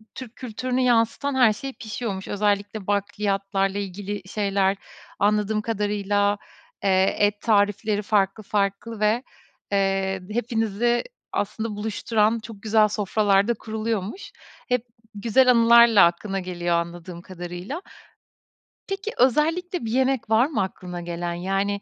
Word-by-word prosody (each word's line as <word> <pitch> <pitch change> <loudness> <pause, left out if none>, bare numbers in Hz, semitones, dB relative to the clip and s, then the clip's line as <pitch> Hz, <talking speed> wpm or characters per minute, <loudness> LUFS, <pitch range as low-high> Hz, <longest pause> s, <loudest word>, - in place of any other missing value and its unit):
Türk 245 -3 -9
kültürünü 255 +1 -3
yansıtan 245 +3 +2
her 245 -5 +5
şey 270 +5 -7
pişiyormuş. 215 -4 -5
Özellikle 205 0 -1
bakliyatlarla 200 -1 -1
ilgili 205 +1 -4
şeyler 195 -1 0 0.4
anladığım 210 +1 +2
kadarıyla, 205 -2 0 0.5
eee, 190 -1 +3
et 205 0 +2
tarifleri 205 -1 +2
farklı 205 0 +1
farklı 205 +2 -2
ve, 215 +4 +2 0.5
eee, 195 -1 0
hepinizi 225 +1 0 0.3
aslında 220 +1 -2
buluşturan 215 +1 0
çok 215 -2 -11
güzel 215 0 +4
sofralar 205 -1 +2
da 240 - +2
kuruluyormuş. 220 - -4 0.4
Hep 250 -1 0 0.3
güzel 235 +5 +4
anılarla 235 -3 +7
aklına 195 +3 -1
geliyor 175 -2 -2
anladığım 170 +1 -4
kadarıyla 180 - -7 1.1
peki 395 +2 -4
özellikle 320 +5 +1
bir 220 - -3
yemek 260 -2 +1
var 225 +3 +5
mı 300 - -1
aklına 180 -2 -6
gelen 170 0 -4
yani 195 +3 -1
210 Hz, 120 wpm, -24 LUFS, 195-230 Hz, 1.1 s, anılarla